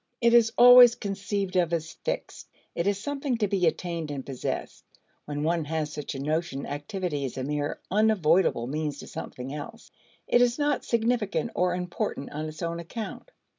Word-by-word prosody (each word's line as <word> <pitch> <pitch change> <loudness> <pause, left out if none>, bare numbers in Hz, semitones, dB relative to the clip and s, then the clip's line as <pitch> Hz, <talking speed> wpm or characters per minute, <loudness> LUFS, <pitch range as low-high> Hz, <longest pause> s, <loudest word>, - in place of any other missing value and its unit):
It 235 -1 +4
is 230 -2 +6
always 245 -1 +9
conceived 195 -1 -3
of 175 -2 +2
as 160 -1 -2
fixed; - - -4 0.2
it 170 +3 -1
is 200 -1 +2
something 275 +1 -2
to 210 -2 +1
be 190 -3 +1
attained 170 -1 -2
and 140 -3 -5
possessed. 135 -3 -4 0.4
When 145 0 -3
one 165 0 0
has 155 -1 -2
such 150 -1 -5
a - - -5
notion, 155 0 -2
activity 150 0 -3
is 130 -2 -4
a 130 - -2
mere 145 +1 -2
unavoidable 190 - +3
means 150 +2 -3
to - - -9
something 130 +2 -7
else; 225 +11 -8 0.4
it 240 - +4
is 245 0 +3
not 290 -2 0
significant 230 -1 0
or 180 0 +1
important 180 -5 -3
on 155 +1 -4
its 155 +2 -7
own 170 0 -2
account. 220 - -7
175 Hz, 175 wpm, -27 LUFS, 150-220 Hz, 0.4 s, always